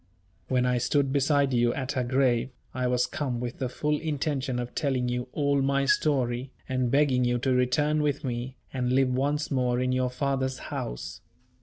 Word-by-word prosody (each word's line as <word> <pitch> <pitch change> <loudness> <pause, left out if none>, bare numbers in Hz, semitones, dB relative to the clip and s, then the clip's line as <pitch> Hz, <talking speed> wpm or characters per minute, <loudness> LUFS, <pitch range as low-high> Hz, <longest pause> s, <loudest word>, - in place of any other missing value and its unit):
When 125 -1 +2
I 125 -1 +2
stood 140 +2 +1
beside 140 -1 +2
you 120 0 +2
at 130 -1 -3
her 130 -3 0
grave, 125 -1 +2 0.2
I 125 0 -1
was 125 0 +2
come 125 -1 -3
with 120 0 -5
the 130 - -1
full 150 +3 -1
intention 145 -4 -2
of 120 0 -4
telling 130 -4 0
you 125 +1 -2
all 140 -2 +1
my 140 0 +2
story, 130 -3 +1 0.2
and 130 -2 0
begging 135 -1 +3
you 120 0 +2
to 130 +2 +1
return 145 +5 +2
with 145 -1 0
me, 125 0 -3 0.2
and 125 -1 0
live 135 0 +3
once 145 +4 0
more 125 -2 +1
in 130 0 +1
your 130 0 +1
father's 130 0 -1 0.2
house. - - -5
130 Hz, 185 wpm, -27 LUFS, 125-140 Hz, 0.2 s, begging